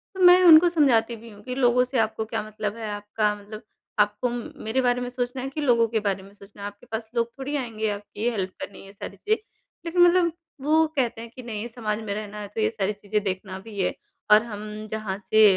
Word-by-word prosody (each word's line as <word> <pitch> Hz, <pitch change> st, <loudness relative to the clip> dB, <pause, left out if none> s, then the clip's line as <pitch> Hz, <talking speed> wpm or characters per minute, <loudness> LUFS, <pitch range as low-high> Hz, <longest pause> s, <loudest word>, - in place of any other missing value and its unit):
तो -, -, -7 dB
मैं 360 Hz, +1 st, +9 dB
उनको 335 Hz, +1 st, +9 dB
समझाती 245 Hz, -8 st, +3 dB
भी 230 Hz, +1 st, -12 dB
हूँ 205 Hz, 0 st, -14 dB
कि 250 Hz, +1 st, -4 dB
लोगों 250 Hz, -1 st, +4 dB
से 255 Hz, -1 st, -1 dB
आपको 220 Hz, 0 st, 0 dB
क्या 220 Hz, -, -2 dB
मतलब 215 Hz, -1 st, -4 dB
है? 220 Hz, -2 st, -4 dB
आपका 210 Hz, +1 st, 0 dB
मतलब 210 Hz, +2 st, -10 dB, 0.4 s
आपको 210 Hz, +4 st, +2 dB
म 240 Hz, 0 st, -5 dB
मेरे 235 Hz, +4 st, +1 dB
बारे 245 Hz, 0 st, +2 dB
में 245 Hz, -, -3 dB
सोचना 250 Hz, +1 st, -3 dB
है 270 Hz, -, -3 dB
कि 300 Hz, +2 st, -4 dB
लोगों 235 Hz, -4 st, +4 dB
के 220 Hz, 0 st, 0 dB
बारे 195 Hz, -2 st, -1 dB
में 195 Hz, -, -14 dB
सोचना 200 Hz, 0 st, -15 dB
है? 200 Hz, -, -3 dB
आपके 205 Hz, +4 st, -11 dB
पास 220 Hz, 0 st, -4 dB
लोग 235 Hz, -1 st, +2 dB
थोड़ी 285 Hz, +2 st, -3 dB
आएँगे 225 Hz, -5 st, -2 dB
आपकी 205 Hz, +3 st, -3 dB
हेल्प 190 Hz, -4 st, -2 dB
करने 200 Hz, -, -7 dB
ये 195 Hz, -, -12 dB
सारी 200 Hz, -, -8 dB
चीज़ें 435 Hz, 0 st, 0 dB, 0.4 s
लेकिन 350 Hz, +1 st, +2 dB
मतलब 350 Hz, -1 st, +5 dB, 0.3 s
वो 315 Hz, +3 st, +4 dB
कहते 235 Hz, -3 st, 0 dB
हैं 230 Hz, -, -8 dB
कि 255 Hz, -, -8 dB
नहीं 225 Hz, -1 st, -4 dB
समाज 220 Hz, -2 st, -3 dB
में 205 Hz, -2 st, -3 dB
रहना 210 Hz, 0 st, -6 dB
है 205 Hz, -, -5 dB
तो 220 Hz, -, 0 dB
ये 215 Hz, -, +3 dB
सारी 210 Hz, -2 st, -1 dB
चीज़ें 210 Hz, +1 st, -2 dB
देखना 190 Hz, 0 st, -3 dB
भी 210 Hz, -3 st, -8 dB
है 180 Hz, -, +1 dB, 0.4 s
और 215 Hz, +2 st, +8 dB
हम 215 Hz, -1 st, -7 dB
जहाँ 215 Hz, -3 st, -3 dB
से 215 Hz, +1 st, +4 dB
220 Hz, 240 wpm, -25 LUFS, 210-250 Hz, 0.4 s, मैं